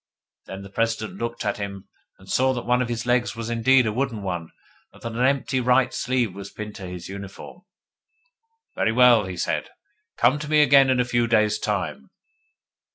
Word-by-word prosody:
Then 95 +1 -8
the 100 - -12
President 115 0 -2
looked 120 -1 -4
at 105 - -1
him, 100 -1 -6 0.3
and - - -18
saw 130 +1 +2
that 120 - -5
one 125 +1 +2
of 125 - -2
his 120 0 -3
legs 120 -1 +1
was 115 0 -5
indeed 125 +2 +4
a 110 - -1
wooden 120 -4 -2
one, 90 -4 -4 0.4
and - - -18
that 115 - -6
an 115 - -5
empty 135 0 +1
right 125 +1 +2
sleeve 125 -6 -1
was 100 +1 -8
pinned 105 0 -8
to 95 - -7
his 90 -1 -8
uniform. 100 - -9 1.1
'Very 110 - 0
well,' 120 -3 +6
he 90 -1 -6
said. - - -2 0.5
'Come 130 +5 +3
to 150 0 -6
me 155 -1 +5
again 135 -1 +6
in 130 -1 +2
a 125 - +2
few 120 -1 +1
days' 110 -2 +2
time. - - -3
115 Hz, 195 wpm, -24 LUFS, 105-125 Hz, 1.1 s, well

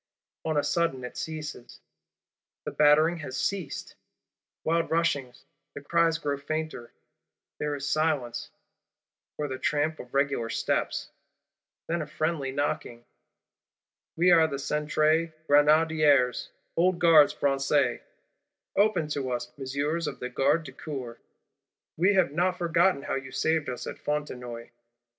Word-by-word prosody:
—On 155 -1 0
a 145 - +2
sudden 165 -7 0
it 125 - -7
ceases; 155 -6 -6 0.9
the - - -3
battering 155 +3 +4
has 135 -5 -6
ceased! 190 -7 -3 0.7
Wild 165 +1 +1
rushing: 145 -7 0 0.4
the 145 - -6
cries 165 +2 +2
grow 145 -3 -2
fainter: 155 -4 -4 0.7
there 150 0 -1
is 140 0 -5
silence, 145 -5 0 0.9
or 150 - -2
the 130 -1 -5
tramp 155 +2 0
of 125 +2 -10
regular 140 -4 +1
steps; - - -1 0.7
then 170 0 -1
a 150 - -5
friendly 155 -3 -2
knocking: 130 -4 -3 1.1
'We 180 +2 +4
are 165 -2 +6
the 140 - -4
Centre 155 +3 +1
Grenadiers, 150 -3 +4 0.3
old 180 +1 +3
Gardes 165 -4 +6
Françaises: 140 0 +1 0.7
Open 195 -6 +2
to 140 -3 -2
us, 120 -1 -3
Messieurs 145 +5 -2
of - - -5
the 125 - -4
Garde 135 +6 +2
du - - -9
Corps; 125 -6 -7 0.8
we 190 +5 +3
have 185 -6 +3
not 180 +4 +1
forgotten 170 -2 +2
how - - -3
you 135 0 -4
saved 160 -3 0
us 125 - -5
at - - -7
Fontenoy! 125 -6 -4
150 Hz, 130 wpm, -27 LUFS, 135-165 Hz, 1.1 s, are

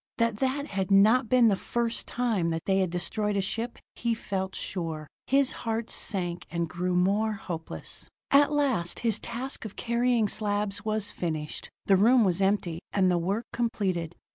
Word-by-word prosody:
That 230 -2 +1
that 270 +4 0
had 190 -1 -2
not 215 +4 +5
been 250 -2 +5
the 205 - +4
first 235 +3 -2
time 225 -9 0
that 165 0 -3
they 195 0 +2
had 185 -2 +1
destroyed 205 +4 -1
a - - +2
ship, 225 +5 -3 0.2
he 235 -1 0
felt 190 -3 -3
sure; 165 -4 -4 0.2
his 275 0 +4
heart 225 0 -2
sank, 175 -4 -1
and 170 -1 -1
grew 180 +2 -2
more 200 +5 +2
hopeless. 170 -5 -6 0.2
At 285 +1 +6
last 265 - 0
his 230 -3 +2
task 250 +3 -3
of 215 -3 -7
carrying 235 -1 +1
slabs 205 -1 -1
was 215 -1 0
finished. 155 -3 -4 0.2
The 195 - +5
room 235 +5 +5
was 190 -1 +1
empty, 190 -4 +1
and 185 -2 +3
the 175 - +2
work 195 +7 -1
completed. 190 -8 -1
205 Hz, 170 wpm, -28 LUFS, 180-230 Hz, 0.2 s, At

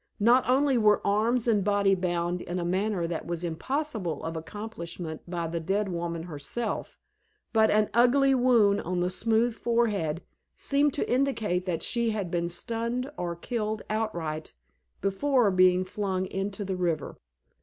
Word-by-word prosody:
Not 240 +4 +4
only 265 -1 +3
were 210 -1 +4
arms 225 +4 +2
and 210 -4 +3
body 200 -1 +3
bound 175 -1 -1
in 175 - -4
a 175 - -2
manner 190 0 0
that 165 -1 -4
was 170 0 -3
impossible 200 - -2
of 165 0 -4
accomplishment 170 -3 -6
by 170 -1 -2
the 165 +1 -3
dead 195 +5 -1
woman 170 -1 -3
herself, 175 +8 -4 0.6
but 220 -1 +4
an 210 0 +3
ugly 265 +4 +4
wound 235 -6 +4
on 180 0 -2
the 180 +1 0
smooth 225 +4 +2
forehead 215 -9 0 0.3
seemed 285 0 +1
to - - -1
indicate 225 -9 0
that 170 -3 -1
she 235 -1 +1
had 205 -5 -3
been 170 -1 -1
stunned 235 +8 -2
or 175 -6 -3
killed 215 +3 -3
outright 170 - -3 0.5
before 225 +3 +2
being 185 0 +4
flung 190 -1 -2
into 195 +2 -4
the 190 -1 -2
river. 175 -3 -2
200 Hz, 155 wpm, -27 LUFS, 175-230 Hz, 0.6 s, Not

